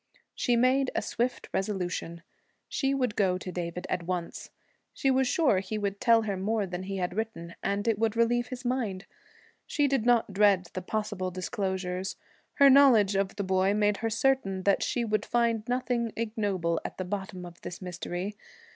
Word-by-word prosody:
She 245 Hz, -, +1 dB
made 255 Hz, +2 st, +3 dB
a -, -, +1 dB
swift 245 Hz, +1 st, -2 dB
resolution. 180 Hz, -4 st, -3 dB, 0.4 s
She 270 Hz, -2 st, 0 dB
would 250 Hz, -6 st, 0 dB
go 185 Hz, -3 st, +2 dB
to 185 Hz, 0 st, -6 dB
David 175 Hz, 0 st, -4 dB
at -, -, -1 dB
once. 175 Hz, 0 st, -4 dB, 0.5 s
She 270 Hz, -, +2 dB
was 260 Hz, 0 st, +2 dB
sure 260 Hz, -, +3 dB
he 195 Hz, +3 st, -4 dB
would 200 Hz, -1 st, -3 dB
tell 230 Hz, -1 st, +5 dB
her 205 Hz, -2 st, -2 dB
more 205 Hz, +2 st, 0 dB
than 180 Hz, -1 st, -5 dB
he 195 Hz, +1 st, -4 dB
had 180 Hz, -1 st, -2 dB
written, 215 Hz, -6 st, -4 dB
and 200 Hz, +2 st, -1 dB
it 220 Hz, -3 st, +2 dB
would 225 Hz, -1 st, +1 dB
relieve 240 Hz, +1 st, +2 dB
his 255 Hz, 0 st, -7 dB
mind. 230 Hz, -7 st, -1 dB, 0.6 s
She 290 Hz, -2 st, +2 dB
did 270 Hz, -4 st, +1 dB
not 235 Hz, -4 st, +3 dB
dread 195 Hz, -3 st, +3 dB
the 185 Hz, -, -3 dB
possible 205 Hz, -1 st, -2 dB
disclosures. 185 Hz, 0 st, -3 dB, 0.4 s
Her 280 Hz, -, +6 dB
knowledge 260 Hz, -7 st, +6 dB
of 195 Hz, 0 st, 0 dB
the 200 Hz, -, -2 dB
boy 190 Hz, +1 st, +2 dB
made 210 Hz, -1 st, +2 dB
her 225 Hz, -, -1 dB
certain 225 Hz, -5 st, +1 dB
that 200 Hz, 0 st, +3 dB
she 240 Hz, -2 st, 0 dB
would 215 Hz, -1 st, 0 dB
find 230 Hz, -2 st, 0 dB
nothing 245 Hz, -2 st, -1 dB
ignoble 205 Hz, -7 st, -1 dB
at -, -, -6 dB
the 185 Hz, -, -3 dB
bottom 190 Hz, -1 st, -5 dB
of 175 Hz, 0 st, -11 dB
his 180 Hz, -, -6 dB
mystery. 180 Hz, +2 st, -5 dB
205 Hz, 180 wpm, -28 LUFS, 185-235 Hz, 0.6 s, Her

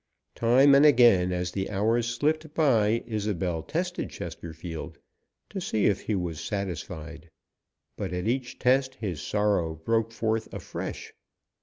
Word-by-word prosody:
Time 130 Hz, +5 st, +5 dB
and 140 Hz, +1 st, +7 dB
again, 120 Hz, -11 st, +6 dB
as 90 Hz, -1 st, -2 dB
the 95 Hz, +1 st, -3 dB
hours 110 Hz, +4 st, +1 dB
slipped 155 Hz, +5 st, -1 dB
by, 115 Hz, -7 st, +3 dB
Isobel 100 Hz, -7 st, -2 dB
tested 175 Hz, -, -3 dB
Chesterfield, 80 Hz, -1 st, -7 dB, 0.5 s
to 195 Hz, -, -4 dB
see 110 Hz, -, 0 dB
if 100 Hz, -, +2 dB
he 110 Hz, -, -1 dB
was 85 Hz, -4 st, -3 dB
satisfied, 85 Hz, -4 st, -5 dB, 0.7 s
but -, -, -4 dB
at 90 Hz, +2 st, -3 dB
each 125 Hz, +1 st, -2 dB
test 130 Hz, +1 st, +2 dB
his 90 Hz, -9 st, -4 dB
sorrow 100 Hz, -6 st, 0 dB
broke 115 Hz, +7 st, 0 dB
forth 110 Hz, -1 st, -2 dB
afresh. -, -, -6 dB
110 Hz, 135 wpm, -27 LUFS, 90-125 Hz, 0.7 s, and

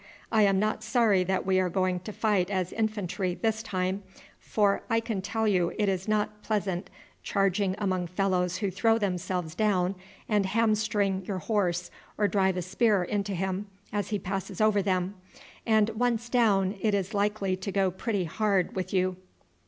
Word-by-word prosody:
"I 220 Hz, -, +4 dB
am 195 Hz, -2 st, +4 dB
not 215 Hz, +2 st, 0 dB
sorry 220 Hz, -4 st, +3 dB
that 190 Hz, 0 st, 0 dB
we 190 Hz, 0 st, +3 dB
are 185 Hz, -1 st, +1 dB
going 185 Hz, 0 st, 0 dB
to 200 Hz, +4 st, -7 dB
fight 205 Hz, -4 st, +1 dB
as 185 Hz, -3 st, -1 dB
infantry 205 Hz, -4 st, -1 dB
this 220 Hz, +1 st, 0 dB
time, 190 Hz, -2 st, -2 dB, 0.4 s
for 205 Hz, -2 st, +1 dB
I 225 Hz, -1 st, +3 dB
can 225 Hz, -4 st, -3 dB
tell 220 Hz, +3 st, -1 dB
you 180 Hz, -4 st, +2 dB
it 210 Hz, -2 st, +1 dB
is 190 Hz, 0 st, -1 dB
not 210 Hz, 0 st, 0 dB
pleasant 200 Hz, -4 st, -2 dB, 0.3 s
charging 195 Hz, -1 st, +1 dB
among 185 Hz, -3 st, -1 dB
fellows 180 Hz, -1 st, 0 dB
who 200 Hz, -2 st, -1 dB
throw 225 Hz, +4 st, +3 dB
themselves 180 Hz, -4 st, -2 dB
down 190 Hz, -2 st, +1 dB, 0.3 s
and 205 Hz, -3 st, +2 dB
hamstring 210 Hz, -2 st, +1 dB
your 195 Hz, -, -2 dB
horse 180 Hz, -2 st, -1 dB, 0.3 s
or 210 Hz, -, +3 dB
drive 190 Hz, -2 st, +1 dB
a 180 Hz, -, -1 dB
spear 195 Hz, +1 st, +2 dB
into 200 Hz, +1 st, -2 dB
him 190 Hz, +3 st, -2 dB, 0.3 s
as 205 Hz, -1 st, -1 dB
he 210 Hz, -, 0 dB
passes 190 Hz, 0 st, -4 dB
over 215 Hz, -2 st, +4 dB
them; 185 Hz, -1 st, 0 dB, 0.5 s
and 220 Hz, -1 st, +4 dB
once 235 Hz, +1 st, 0 dB
down 205 Hz, -5 st, +2 dB
it 215 Hz, -2 st, +2 dB
is 195 Hz, +2 st, -2 dB
likely 200 Hz, -2 st, 0 dB
to 195 Hz, +2 st, -4 dB
go 190 Hz, -1 st, +2 dB
pretty 200 Hz, +1 st, -2 dB
hard 195 Hz, +2 st, 0 dB
with 185 Hz, -1 st, -3 dB
you." 185 Hz, 0 st, +1 dB
195 Hz, 175 wpm, -28 LUFS, 185-215 Hz, 0.5 s, I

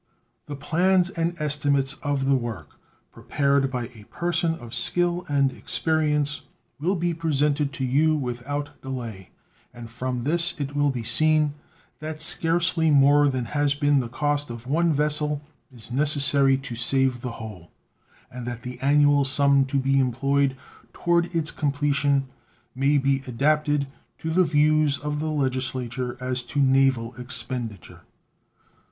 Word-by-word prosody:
The 145 Hz, -, -5 dB
plans 180 Hz, +5 st, +1 dB
and 170 Hz, -1 st, -2 dB
estimates 145 Hz, -2 st, +1 dB
of 145 Hz, -2 st, -1 dB
the 135 Hz, -, +3 dB
work, 110 Hz, -, -5 dB, 0.4 s
prepared 140 Hz, -1 st, 0 dB
by 125 Hz, -2 st, -3 dB
a 110 Hz, -5 st, -15 dB
person 170 Hz, +2 st, -1 dB
of 120 Hz, -6 st, -11 dB
skill 175 Hz, +8 st, +1 dB
and 140 Hz, -2 st, +2 dB
experience, 150 Hz, -2 st, -1 dB, 0.4 s
will 180 Hz, +7 st, 0 dB
be 175 Hz, -1 st, -1 dB
presented 150 Hz, -3 st, 0 dB
to 130 Hz, -, -3 dB
you 155 Hz, +5 st, +2 dB
without 145 Hz, +2 st, -5 dB
delay, 115 Hz, -8 st, -7 dB, 0.4 s
and 120 Hz, -1 st, -11 dB
from 125 Hz, 0 st, -4 dB
this 170 Hz, +5 st, +2 dB
it 145 Hz, 0 st, -4 dB
will 145 Hz, 0 st, +2 dB
be 125 Hz, -4 st, -3 dB
seen 155 Hz, +5 st, +2 dB, 0.5 s
that 155 Hz, 0 st, -6 dB
scarcely 165 Hz, +1 st, +2 dB
more 145 Hz, 0 st, +5 dB
than 130 Hz, -2 st, -2 dB
has 145 Hz, +3 st, 0 dB
been 145 Hz, -1 st, +2 dB
the 120 Hz, -3 st, -3 dB
cost 145 Hz, +2 st, -1 dB
of 120 Hz, 0 st, -8 dB
one 165 Hz, +5 st, +1 dB
vessel 150 Hz, 0 st, 0 dB, 0.3 s
is 120 Hz, -2 st, -12 dB
necessary 140 Hz, -1 st, +3 dB
to 135 Hz, -1 st, -8 dB
save 125 Hz, +1 st, +2 dB
the 125 Hz, -2 st, -5 dB
whole, 105 Hz, -7 st, -10 dB, 0.6 s
and 125 Hz, -1 st, -7 dB
that 120 Hz, 0 st, -6 dB
the 125 Hz, -1 st, -7 dB
annual 145 Hz, +1 st, +4 dB
sum 140 Hz, 0 st, +3 dB
to 135 Hz, +1 st, -2 dB
be 135 Hz, +1 st, +2 dB
employed 135 Hz, +2 st, +1 dB, 0.4 s
toward 170 Hz, 0 st, +1 dB
its 160 Hz, -2 st, 0 dB
completion 140 Hz, -1 st, 0 dB, 0.5 s
may 140 Hz, +3 st, +2 dB
be 135 Hz, 0 st, +1 dB
adapted 145 Hz, +3 st, +1 dB, 0.3 s
to 160 Hz, -, -4 dB
the 185 Hz, +3 st, +4 dB
views 150 Hz, -2 st, +3 dB
of 150 Hz, 0 st, -4 dB
the 155 Hz, +1 st, -2 dB
Legislature 130 Hz, -3 st, -2 dB
as 125 Hz, 0 st, -2 dB
to 135 Hz, +4 st, -4 dB
naval 135 Hz, -3 st, +2 dB
expenditure. 120 Hz, -, -4 dB
140 Hz, 145 wpm, -24 LUFS, 130-150 Hz, 0.6 s, more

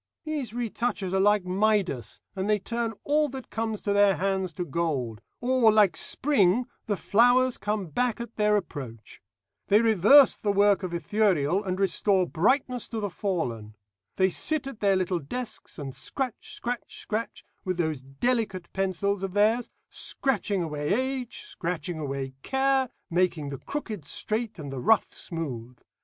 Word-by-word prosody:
These 300 Hz, -7 st, -3 dB
retouchers 230 Hz, -4 st, -2 dB
are 190 Hz, -, +2 dB
like 205 Hz, -1 st, +3 dB
Midas, 190 Hz, -, 0 dB
and 190 Hz, +2 st, -2 dB
they 210 Hz, -, +4 dB
turn 230 Hz, +2 st, -3 dB
all 300 Hz, +1 st, +2 dB
that 265 Hz, -1 st, -8 dB
comes 220 Hz, -1 st, -2 dB
to 205 Hz, -, 0 dB
their 200 Hz, -1 st, +5 dB
hands 190 Hz, -1 st, -1 dB
to 175 Hz, +3 st, -3 dB
gold; 135 Hz, -9 st, -2 dB, 0.2 s
or, 245 Hz, -2 st, +4 dB
like 205 Hz, -5 st, +4 dB
Spring, 240 Hz, -, +2 dB, 0.2 s
the 205 Hz, -2 st, 0 dB
flowers 245 Hz, +5 st, +3 dB
come 210 Hz, -1 st, -1 dB
back 235 Hz, -, -1 dB
at 235 Hz, -1 st, -7 dB
their 210 Hz, 0 st, +3 dB
approach. 130 Hz, -, -7 dB, 0.5 s
They 205 Hz, -, +5 dB
reverse 230 Hz, +5 st, +6 dB
the 205 Hz, -, 0 dB
work 200 Hz, 0 st, +4 dB
of 185 Hz, -2 st, -4 dB
Ithuriel, 185 Hz, -2 st, +1 dB
and 185 Hz, -1 st, -3 dB
restore 195 Hz, 0 st, +2 dB
brightness 250 Hz, -, +1 dB
to 225 Hz, -, -4 dB
the 205 Hz, -2 st, -3 dB
fallen. 120 Hz, -, -3 dB, 0.4 s
They 190 Hz, 0 st, +3 dB
sit 310 Hz, -, 0 dB
at 275 Hz, -5 st, -7 dB
their 200 Hz, -2 st, +3 dB
little 185 Hz, -1 st, 0 dB
desks, 220 Hz, -, -6 dB
and 135 Hz, -3 st, -6 dB
scratch, 260 Hz, -, -4 dB
scratch, 245 Hz, 0 st, -5 dB
scratch 220 Hz, +2 st, -4 dB, 0.2 s
with 185 Hz, -2 st, -2 dB
those 160 Hz, -5 st, -1 dB
delicate 185 Hz, -, -2 dB
pencils 195 Hz, +1 st, 0 dB
of 195 Hz, 0 st, -4 dB
theirs, 220 Hz, +4 st, +3 dB, 0.2 s
scratching 205 Hz, -8 st, -1 dB
away 150 Hz, -2 st, -3 dB
age, 260 Hz, -, -3 dB
scratching 175 Hz, -, -4 dB
away 135 Hz, -2 st, -4 dB
care, 265 Hz, -, +1 dB, 0.2 s
making 170 Hz, -4 st, +1 dB
the 140 Hz, -, -6 dB
crooked 220 Hz, -, -5 dB
straight, 215 Hz, +7 st, -2 dB
and 145 Hz, -4 st, -7 dB
the 135 Hz, -, -4 dB
rough 225 Hz, -, +3 dB
smooth. 125 Hz, -8 st, -6 dB
200 Hz, 155 wpm, -27 LUFS, 170-235 Hz, 0.5 s, reverse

